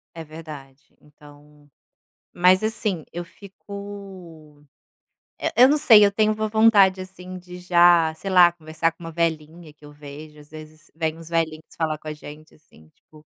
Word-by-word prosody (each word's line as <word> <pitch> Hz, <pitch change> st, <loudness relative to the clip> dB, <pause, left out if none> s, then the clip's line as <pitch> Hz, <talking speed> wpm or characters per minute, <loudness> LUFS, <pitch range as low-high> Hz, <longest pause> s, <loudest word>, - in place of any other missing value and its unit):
É 165 Hz, -, -7 dB
verdade, 155 Hz, -2 st, -13 dB
então 145 Hz, 0 st, -20 dB, 0.6 s
mas 180 Hz, +1 st, +4 dB
assim, 215 Hz, -6 st, -2 dB
eu 175 Hz, 0 st, -6 dB
fico 190 Hz, -6 st, -12 dB, 0.8 s
eh, -, -, -3 dB
eu 250 Hz, +2 st, +7 dB
não 295 Hz, -, +3 dB
sei, 220 Hz, -7 st, +7 dB
eu 200 Hz, -, -1 dB
tenho 215 Hz, +1 st, +2 dB
uma 215 Hz, 0 st, -3 dB
vontade, 210 Hz, -3 st, +4 dB
assim, 185 Hz, 0 st, -10 dB
de 180 Hz, 0 st, -12 dB
já, 175 Hz, -2 st, +4 dB
sei 195 Hz, +5 st, -7 dB
lá, 180 Hz, -2 st, +6 dB
conversar 160 Hz, 0 st, -3 dB
com 165 Hz, -, -20 dB
uma 165 Hz, -, -7 dB
velhinha 160 Hz, 0 st, -3 dB
que 150 Hz, 0 st, -23 dB
eu 145 Hz, -, -13 dB
vejo. 150 Hz, +1 st, -12 dB
Às 150 Hz, -, -18 dB
vezes 155 Hz, +1 st, -14 dB
vêm 160 Hz, -1 st, -3 dB
uns 165 Hz, 0 st, -12 dB
velhinhos 160 Hz, -2 st, -2 dB
falar 155 Hz, -2 st, -2 dB
com 155 Hz, -, -11 dB
a -, -, -3 dB
gente, 150 Hz, +1 st, -13 dB
assim, 110 Hz, -, -23 dB
tipo 155 Hz, -1 st, -21 dB
165 Hz, 170 wpm, -22 LUFS, 155-185 Hz, 0.8 s, eu